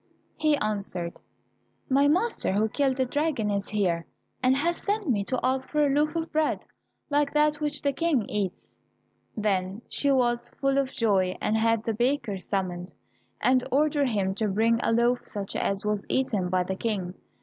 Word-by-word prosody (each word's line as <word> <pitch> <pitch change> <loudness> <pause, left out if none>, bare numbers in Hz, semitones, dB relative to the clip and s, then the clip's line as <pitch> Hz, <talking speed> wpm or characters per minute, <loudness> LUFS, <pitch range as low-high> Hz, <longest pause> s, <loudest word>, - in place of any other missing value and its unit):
He 305 -1 +2
answered, 200 -6 -3 0.7
"My 275 +2 +4
master, 365 - +1
who 210 +2 +2
killed 270 +2 +1
the 260 - +2
dragon, 285 -6 0
is 200 0 -2
here, 180 -5 0 0.3
and 255 +1 +3
has 340 +4 0
sent 410 -1 -2
me 215 -7 +1
to 255 +2 -1
ask 260 +1 0
for 300 -1 +2
a 280 - +2
loaf 300 +2 +1
of 325 0 -2
bread 310 0 0 0.5
like 290 -1 +2
that 300 0 +3
which 295 -1 -1
the 280 -1 +1
King 290 -8 +1
eats." 200 -3 -4 0.6
Then 200 0 -1
she 285 - 0
was 240 -2 +1
full 275 0 +2
of 270 -1 -1
joy 195 -7 +1
and 215 - 0
had 225 0 +2
the 225 - -1
baker 240 -3 0
summoned, 180 -1 -3 0.5
and 255 0 +3
ordered 290 -1 +2
him 195 -4 0
to 215 - +2
bring 225 +3 +2
a - - +1
loaf 240 +2 +3
such 200 -2 -3
as 195 +1 -1
was 210 -1 -1
eaten 225 -9 0
by 180 0 +2
the 190 +1 -3
King. 195 -4 -2
240 Hz, 180 wpm, -27 LUFS, 200-285 Hz, 0.7 s, My